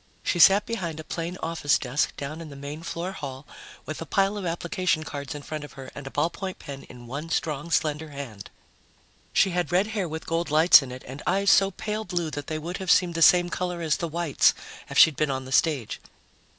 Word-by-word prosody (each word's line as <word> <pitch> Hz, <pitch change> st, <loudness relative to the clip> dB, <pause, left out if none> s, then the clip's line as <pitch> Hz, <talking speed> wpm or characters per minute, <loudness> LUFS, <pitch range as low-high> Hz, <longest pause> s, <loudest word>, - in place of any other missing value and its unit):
She 175 Hz, -, 0 dB
sat 200 Hz, +4 st, +7 dB
behind 175 Hz, -9 st, -4 dB
a -, -, -6 dB
plain 170 Hz, +3 st, -4 dB
office 160 Hz, -3 st, +1 dB
desk 130 Hz, +3 st, -1 dB
down 150 Hz, +3 st, -5 dB
in 160 Hz, -, -8 dB
the 140 Hz, -, -10 dB
main 140 Hz, +3 st, -7 dB
floor 170 Hz, +2 st, -4 dB
hall, 140 Hz, -6 st, -7 dB, 0.4 s
with 155 Hz, +1 st, -6 dB
a -, -, -4 dB
pile 195 Hz, +4 st, +2 dB
of 200 Hz, -3 st, -3 dB
application 170 Hz, -1 st, -1 dB
cards 145 Hz, -1 st, -6 dB
in 145 Hz, -, -7 dB
front 155 Hz, 0 st, -5 dB
of 145 Hz, -, -10 dB
her 135 Hz, -1 st, -10 dB
and 140 Hz, -1 st, -8 dB
a -, -, -4 dB
ballpoint 170 Hz, +6 st, -2 dB
pen 140 Hz, -1 st, -8 dB
in 120 Hz, -1 st, -12 dB
one 140 Hz, +7 st, -6 dB
strong, 155 Hz, -1 st, -2 dB
slender 155 Hz, -1 st, 0 dB
hand. 135 Hz, -8 st, -8 dB, 0.8 s
She 190 Hz, -, +3 dB
had 175 Hz, 0 st, -1 dB
red 185 Hz, +3 st, +3 dB
hair 195 Hz, -6 st, -1 dB
with 160 Hz, +1 st, -6 dB
gold 165 Hz, +1 st, -1 dB
lights 155 Hz, +2 st, +7 dB
in 130 Hz, -2 st, -7 dB
it 130 Hz, 0 st, -8 dB
and 135 Hz, +3 st, -8 dB
eyes 200 Hz, +1 st, +3 dB
so 195 Hz, 0 st, +5 dB
pale 215 Hz, +3 st, -4 dB
blue 175 Hz, -6 st, -2 dB
that 145 Hz, -1 st, -6 dB
they 155 Hz, -, -2 dB
would 170 Hz, +4 st, -5 dB
have 190 Hz, -2 st, -5 dB
seemed 180 Hz, -2 st, +4 dB
the 165 Hz, -, -3 dB
same 175 Hz, +2 st, +6 dB
color 180 Hz, -1 st, -2 dB
as 155 Hz, -2 st, +1 dB
the 170 Hz, -, -2 dB
whites 165 Hz, -2 st, +2 dB, 0.3 s
if -, -, -4 dB
she'd 160 Hz, -, +7 dB
been 155 Hz, +1 st, 0 dB
on 130 Hz, -1 st, -3 dB
the 130 Hz, -, -9 dB
stage. 140 Hz, -6 st, +1 dB
160 Hz, 230 wpm, -26 LUFS, 145-175 Hz, 0.8 s, sat